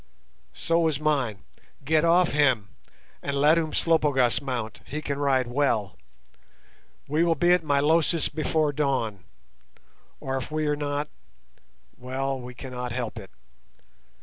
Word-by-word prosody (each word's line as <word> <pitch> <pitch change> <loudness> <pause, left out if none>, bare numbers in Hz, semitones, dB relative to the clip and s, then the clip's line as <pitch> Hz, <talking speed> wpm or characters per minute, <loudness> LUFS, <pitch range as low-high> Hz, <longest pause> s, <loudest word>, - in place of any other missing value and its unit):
"So 165 0 +1
is 150 -3 -1
mine. 140 -10 0 0.4
Get 155 +1 +3
off 170 +1 +4
him, 130 -9 +2 0.5
and 140 0 -2
let 150 +4 +5
Umslopogaas 150 -6 +2
mount; 120 -6 -4
he 150 - -5
can 140 -2 -4
ride 135 -3 +2
well. 120 -6 0 1.1
We 155 +4 +1
will 170 -1 +2
be 175 +4 +4
at 180 -2 +2
Milosis 155 +3 +2
before 155 -1 0
dawn, 125 - -1 0.9
or 135 0 -3
if 130 - -5
we 155 0 -1
are 150 0 +1
not—well, 135 -2 -6
we 125 0 -9
cannot 125 -1 -6
help 120 -2 -4
it. 95 - -11
145 Hz, 125 wpm, -26 LUFS, 125-155 Hz, 1.1 s, let